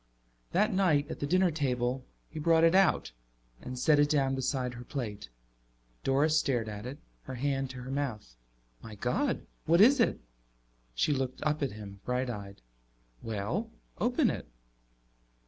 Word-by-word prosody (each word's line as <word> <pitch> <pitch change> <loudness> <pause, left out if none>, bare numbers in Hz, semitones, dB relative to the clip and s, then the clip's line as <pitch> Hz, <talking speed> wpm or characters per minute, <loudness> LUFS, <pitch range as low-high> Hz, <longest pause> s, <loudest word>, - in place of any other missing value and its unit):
That 210 +4 +2
night 160 -6 +2
at - - -6
the 145 - -2
dinner 185 +2 +3
table 130 -4 -1 0.2
he 155 - -7
brought 165 +1 +4
it 165 +1 +6
out 190 - +3 0.5
and 125 0 -6
set 150 +3 +4
it 145 0 +4
down 135 -3 +2
beside 130 -1 -1
her 120 0 -8
plate. 110 - -5 0.7
Doris 145 +4 +3
stared 120 -7 0
at 105 +2 -6
it, 135 +3 -6 0.3
her 130 - -6
hand 135 +1 -1
to 125 -1 -8
her 130 - -6
mouth. 125 - -3 0.5
"My 110 -1 -9
God, 235 - -1 0.2
what 170 +2 +5
is 255 +7 +7
it?" 230 - +2 0.8
She - - +2
looked 130 -2 -3
up 150 0 0
at 135 -6 -1
him, 100 -2 -9
bright 125 0 -1
eyed. 100 - -8 0.6
"Well, 115 - -3 0.3
open 245 +2 +2
it." - - -6
135 Hz, 160 wpm, -30 LUFS, 120-160 Hz, 0.8 s, is